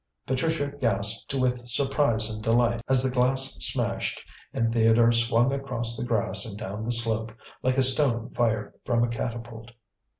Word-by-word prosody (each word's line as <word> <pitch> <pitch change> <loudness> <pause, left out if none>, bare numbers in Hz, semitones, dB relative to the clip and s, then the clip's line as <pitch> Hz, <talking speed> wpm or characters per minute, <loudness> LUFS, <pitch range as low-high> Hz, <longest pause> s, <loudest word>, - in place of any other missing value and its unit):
Patricia 145 +2 -1
gasped 105 -1 0
with 125 -2 -1
surprise 125 -3 +1
and 105 0 -8
delight 115 +1 +1
as 130 -1 +3
the 130 - 0
glass 130 +1 +2
smashed - - 0 0.3
and 115 0 -1
Theodore 115 0 +4
swung 115 +2 +2
across 125 -4 -2
the - - -4
grass 115 -3 +2
and 105 -4 -3
down 105 -1 -6
the - - -1
slope 115 -1 +2 0.3
like 130 +1 0
a 135 - +4
stone 130 -3 +2
fired 110 -3 -1
from 120 -1 +1
a - - +1
catapult. 115 0 -6
120 Hz, 160 wpm, -25 LUFS, 115-130 Hz, 0.3 s, Theodore